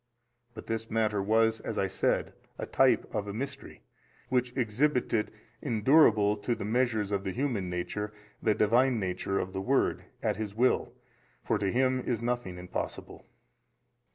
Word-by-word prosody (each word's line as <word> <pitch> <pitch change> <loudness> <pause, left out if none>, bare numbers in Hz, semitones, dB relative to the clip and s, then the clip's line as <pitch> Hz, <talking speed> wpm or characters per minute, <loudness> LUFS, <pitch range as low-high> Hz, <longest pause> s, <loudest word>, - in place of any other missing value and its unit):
But 110 - -8
this 115 0 -3
matter 110 -2 +1
was 110 +2 +2
(as 110 - -5
I 100 - +2
said) 95 - 0 0.2
a - - -4
type - - +3
of 105 -1 -2
a 100 - -4
mystery, 135 +3 -6 0.5
which 125 -1 +1
exhibited 120 -1 +1 0.3
endurable 110 -4 +4
to 120 +3 -1
the 100 - -5
measures 110 -3 +1
of 100 -1 0
the 95 - -2
human 115 -6 -1
nature, 105 +4 -3 0.3
the 110 -2 +2
Divine 120 +3 +3
Nature 95 0 -2
of 95 0 -2
the 95 - -2
Word 135 +7 +2 0.2
22, - - -2
at - - +1
His 105 -2 -4
Will, 125 +3 +2 0.5
for - - 0
to 100 -1 0
Him 130 +1 +2
is 120 -2 -2
nothing 120 -6 -2
impossible. 90 0 -6
110 Hz, 160 wpm, -29 LUFS, 100-125 Hz, 0.5 s, endurable